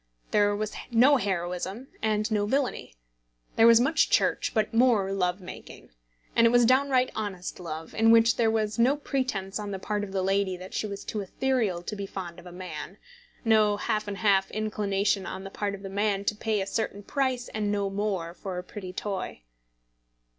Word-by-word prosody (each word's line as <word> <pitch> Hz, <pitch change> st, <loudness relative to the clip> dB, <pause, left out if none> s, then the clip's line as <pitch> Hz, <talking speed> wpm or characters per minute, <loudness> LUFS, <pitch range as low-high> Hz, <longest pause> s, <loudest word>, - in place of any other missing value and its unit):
There 205 Hz, 0 st, +3 dB
was 215 Hz, 0 st, -3 dB, 0.2 s
no 255 Hz, +4 st, +5 dB
heroism 190 Hz, +3 st, -3 dB
and 215 Hz, +1 st, 0 dB
no 205 Hz, -1 st, +1 dB
villainy. 265 Hz, -, -1 dB, 0.6 s
There 225 Hz, -, +6 dB
was 230 Hz, 0 st, +8 dB
much 275 Hz, +6 st, +3 dB
Church, -, -, +2 dB
but 220 Hz, -1 st, 0 dB
more 225 Hz, -5 st, +3 dB
love 180 Hz, -1 st, 0 dB
making. 180 Hz, -, -11 dB, 0.4 s
And 230 Hz, -, +6 dB
it -, -, +5 dB
was 240 Hz, 0 st, +5 dB
downright 260 Hz, 0 st, +3 dB
honest 195 Hz, -5 st, -4 dB
love, 160 Hz, -2 st, -7 dB
in 225 Hz, +1 st, +3 dB
which 230 Hz, +1 st, +6 dB
there 230 Hz, -2 st, +2 dB
was 220 Hz, 0 st, -1 dB
no 255 Hz, +4 st, +4 dB
pretence 255 Hz, -9 st, -2 dB
on 205 Hz, -1 st, -5 dB
the 195 Hz, -, -3 dB
part 205 Hz, +2 st, -2 dB
of 200 Hz, -, -6 dB
the 190 Hz, -1 st, -1 dB
lady 195 Hz, -1 st, +1 dB
that 185 Hz, +1 st, -10 dB
she 215 Hz, -, -1 dB
was 200 Hz, -1 st, -6 dB
too 215 Hz, -, -3 dB
ethereal 205 Hz, -3 st, -1 dB
to 210 Hz, -, -5 dB
be 200 Hz, -1 st, -5 dB
fond 180 Hz, -3 st, -7 dB
of 175 Hz, -, -13 dB
a -, -, -9 dB
man, 180 Hz, 0 st, -7 dB, 0.5 s
no 215 Hz, -2 st, +4 dB
half 215 Hz, 0 st, -1 dB
and 200 Hz, -1 st, -4 dB
half 195 Hz, -3 st, +3 dB
inclination 205 Hz, -2 st, -1 dB
on 190 Hz, -, -6 dB
the 195 Hz, -, -8 dB
part 200 Hz, 0 st, -2 dB
of 195 Hz, -, -13 dB
the -, -, -5 dB
man 200 Hz, 0 st, 0 dB
to 210 Hz, -, +1 dB
pay 215 Hz, -1 st, -1 dB
a -, -, -2 dB
certain 205 Hz, -1 st, -3 dB
price 260 Hz, 0 st, -1 dB
and 210 Hz, -1 st, -2 dB
no 200 Hz, -1 st, 0 dB
more 195 Hz, -4 st, -2 dB
for 185 Hz, 0 st, -6 dB
a 180 Hz, -, -4 dB
pretty 185 Hz, 0 st, -8 dB
toy. 190 Hz, -, -4 dB
205 Hz, 195 wpm, -27 LUFS, 190-225 Hz, 0.6 s, was